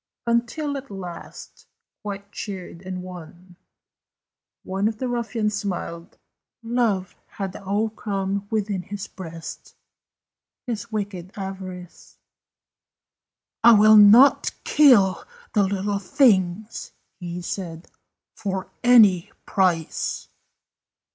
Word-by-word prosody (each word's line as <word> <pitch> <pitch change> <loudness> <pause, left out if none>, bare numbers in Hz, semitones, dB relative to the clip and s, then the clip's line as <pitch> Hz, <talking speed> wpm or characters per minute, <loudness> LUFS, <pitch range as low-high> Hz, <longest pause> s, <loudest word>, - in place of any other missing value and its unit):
Until, 240 +5 -1
at 275 -1 -9
last, 180 -4 -9 0.3
quite 200 -1 -7
cheered 185 -5 -7
and 185 -1 -6
won, 180 0 -11 1.1
One 195 +2 -1
of 220 -1 -3
the 255 - -3
ruffians 230 -3 -1
smiled. 175 -4 -5 0.5
Love 225 -6 0 0.2
had 195 -2 -4
o'ercome 200 -1 -2
within 210 -3 -1
his 200 +1 -7
breast 165 -3 -9 0.9
His 235 -2 -5
wicked 195 -4 -4
avarice. 185 -2 -8 1.5
"I 235 0 +9
will 215 0 +7
not 215 +7 +7
kill 235 -11 +5 0.3
the 205 -3 +3
little 200 +1 -1
things," 200 - +1 0.3
He 175 -1 -6
said, 170 -2 -6 0.5
"for 190 -2 -4
any 215 -8 +6
price!" 175 -5 -1
200 Hz, 95 wpm, -23 LUFS, 185-220 Hz, 1.5 s, I